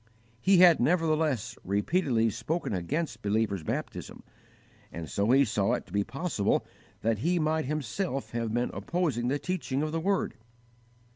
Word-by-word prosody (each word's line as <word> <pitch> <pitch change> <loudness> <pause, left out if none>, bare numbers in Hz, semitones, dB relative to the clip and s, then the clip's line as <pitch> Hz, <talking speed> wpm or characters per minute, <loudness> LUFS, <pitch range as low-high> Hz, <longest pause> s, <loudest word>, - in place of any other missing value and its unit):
He 190 0 +5
had 175 -2 +7
nevertheless 155 - +1
repeatedly 115 - +1
spoken 150 +6 -2
against 115 - -2
believers' 105 -2 0
baptism, 75 - -5 0.7
and 80 -1 -6
so 100 +7 0
he 135 +2 +6
saw 105 +1 +1
it 125 - -2
to - - -16
be 100 0 +2
possible 135 - -1 0.4
that 110 -2 +1
he 175 +9 +1
might 155 -1 +1
himself 150 +1 -3
have 115 -2 -2
been 120 +2 0
opposing 160 -9 -1
the 140 +3 +1
teaching 150 -5 -2
of 155 - -2
the 165 - -1
Word. 195 +3 0
135 Hz, 150 wpm, -29 LUFS, 110-165 Hz, 0.7 s, had